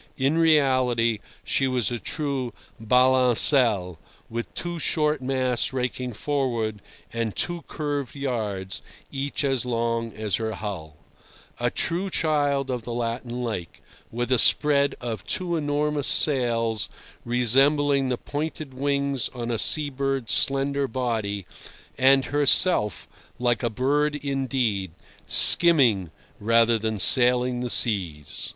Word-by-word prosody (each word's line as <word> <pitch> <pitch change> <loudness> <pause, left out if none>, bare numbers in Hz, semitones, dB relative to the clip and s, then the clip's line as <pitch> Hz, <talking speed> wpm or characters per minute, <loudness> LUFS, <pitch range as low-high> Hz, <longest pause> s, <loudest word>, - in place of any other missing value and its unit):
In 135 +3 0
reality, 130 -8 +2 0.2
she 135 - 0
was 125 -5 -1
a 120 - -4
true 135 -3 -4 0.2
balancelle, 125 - +4 0.3
with 115 +1 -5
two 175 -1 -5
short 150 -2 0
masts 130 -1 -1
raking 125 -1 -4
forward 115 -5 -3 0.3
and 115 -2 -3
two 175 -1 -2
curved 145 -4 -5
yards, 110 -9 -4 0.3
each 140 +2 -4
as 135 -3 0
long 115 -1 -2
as 105 -2 -2
her 110 -1 -4
hull; 80 -9 -7 0.6
a - - 0
true 180 +4 -1
child 145 -5 0
of 125 -1 -3
the 120 +1 -7
Latin 120 +1 -4
lake, 105 -9 -6 0.3
with 120 +2 -4
a 125 - +3
spread 140 +1 +2
of 115 -5 -6
two 175 -2 -1
enormous 145 -1 -1
sails 115 -6 +3 0.3
resembling 135 +3 +2
the 125 - -2
pointed 150 0 -6
wings 140 -1 -1
on 120 -1 -4
a 115 - -2
sea 150 -2 +1
bird's 135 -4 -3
slender 140 +3 +1
body, 110 -6 -3 0.5
and 135 +1 +3
herself, 145 - +1 0.3
like 120 -2 0
a 120 - -1
bird 145 +6 0
indeed, 130 - -2 0.3
skimming 125 - +5 0.3
rather 115 +1 +2
than 110 0 -3
sailing 125 +4 +3
the 125 0 -4
seas. 90 - +3
125 Hz, 125 wpm, -24 LUFS, 115-140 Hz, 0.6 s, skimming